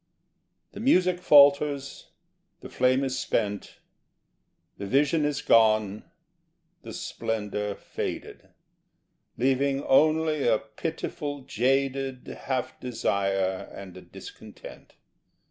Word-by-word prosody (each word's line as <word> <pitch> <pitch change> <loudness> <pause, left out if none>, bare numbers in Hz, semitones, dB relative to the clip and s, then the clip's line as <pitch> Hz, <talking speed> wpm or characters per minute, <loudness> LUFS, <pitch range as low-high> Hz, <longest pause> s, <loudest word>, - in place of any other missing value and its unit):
The - - -10
music 185 -7 +2
falters; 140 -3 +4 0.5
the - - -10
flame 130 +1 +1
is 130 -1 -2
spent; 105 -1 -3 1.0
The 100 - -5
vision 145 +6 +2
is 145 -2 -2
gone, 110 -2 +3 0.8
the - - -10
splendour 105 -2 -4
faded, - - -7 0.9
Leaving 135 +2 +1
only 155 0 +2
a 115 -2 +4
pitiful 145 +4 -6
jaded 135 +1 -1 0.2
Half 130 -2 -3
desire, 100 -5 -1
and 95 -2 -10
a 90 - -10
discontent. - - -13
130 Hz, 95 wpm, -26 LUFS, 110-145 Hz, 1.0 s, falters